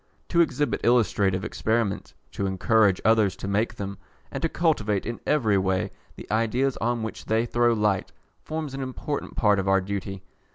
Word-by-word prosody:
To 170 Hz, -, +4 dB
exhibit 150 Hz, -3 st, 0 dB
illustrative 105 Hz, -5 st, +2 dB
experiments, 110 Hz, -3 st, -1 dB, 0.2 s
to 100 Hz, -, -2 dB
encourage 95 Hz, +1 st, +3 dB
others 110 Hz, -3 st, +4 dB
to -, -, -6 dB
make 105 Hz, +3 st, 0 dB
them, 100 Hz, -1 st, -6 dB, 0.3 s
and -, -, -4 dB
to 165 Hz, -, +1 dB
cultivate 110 Hz, -, 0 dB
in 115 Hz, +1 st, -4 dB
every 110 Hz, -10 st, +3 dB
way 95 Hz, -1 st, 0 dB, 0.2 s
the -, -, -9 dB
ideas 120 Hz, +5 st, +1 dB
on 120 Hz, 0 st, -1 dB
which 110 Hz, -, -6 dB
they 110 Hz, +1 st, +1 dB
throw 120 Hz, 0 st, +2 dB
light, 105 Hz, -3 st, 0 dB, 0.3 s
forms 155 Hz, -3 st, -5 dB
an 135 Hz, -, -4 dB
important 135 Hz, +2 st, -4 dB
part 105 Hz, -3 st, +3 dB
of 95 Hz, -, -2 dB
our 95 Hz, 0 st, +4 dB
duty. 95 Hz, 0 st, -5 dB
110 Hz, 170 wpm, -25 LUFS, 100-120 Hz, 0.3 s, To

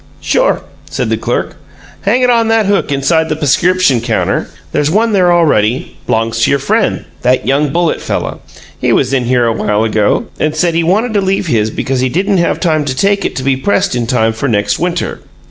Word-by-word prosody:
"Sure," -, -, +1 dB, 0.3 s
said -, -, -2 dB
the -, -, +2 dB
clerk. -, -, -3 dB, 0.4 s
"Hang 235 Hz, +6 st, +1 dB
it 250 Hz, -, +3 dB
on 230 Hz, -1 st, +2 dB
that 225 Hz, -1 st, +2 dB
hook 200 Hz, -6 st, 0 dB
inside 160 Hz, +4 st, +1 dB
the 155 Hz, -, 0 dB
p'scription 155 Hz, -1 st, +2 dB
counter. 115 Hz, -1 st, -1 dB, 0.2 s
There's 150 Hz, 0 st, 0 dB
one 220 Hz, +6 st, +2 dB
there 185 Hz, -4 st, +3 dB
already, 130 Hz, -9 st, +1 dB
b'longs 115 Hz, 0 st, 0 dB
to -, -, +3 dB
your 140 Hz, -, +3 dB
friend, 135 Hz, 0 st, 0 dB, 0.2 s
that 125 Hz, +1 st, +1 dB
young 140 Hz, +2 st, +1 dB
Bullitt 170 Hz, 0 st, 0 dB
fella. -, -, -3 dB, 0.4 s
He -, -, +1 dB
was 135 Hz, -, +1 dB
in 130 Hz, -2 st, +1 dB
here 125 Hz, 0 st, +2 dB
awhile 110 Hz, -2 st, 0 dB
ago 110 Hz, -2 st, +1 dB
and 155 Hz, 0 st, 0 dB
said 170 Hz, +2 st, +1 dB
he 165 Hz, -, +1 dB
wanted 215 Hz, +8 st, +1 dB
to 205 Hz, -, +2 dB
leave 190 Hz, 0 st, 0 dB
his 110 Hz, -8 st, +1 dB
because 130 Hz, +4 st, -2 dB
he 130 Hz, 0 st, +1 dB
didn't 190 Hz, +6 st, 0 dB
have 170 Hz, -, 0 dB
time 155 Hz, -4 st, +1 dB
to 130 Hz, -2 st, -2 dB
take 200 Hz, +7 st, +1 dB
it -, -, -3 dB
to 130 Hz, -, -3 dB
be 135 Hz, 0 st, +2 dB
pressed 195 Hz, +7 st, 0 dB
in 120 Hz, -2 st, -2 dB
time 115 Hz, -3 st, +1 dB
for 115 Hz, +5 st, -3 dB
next 105 Hz, -4 st, 0 dB
winter. 175 Hz, 0 st, -2 dB
150 Hz, 210 wpm, -13 LUFS, 125-185 Hz, 0.4 s, it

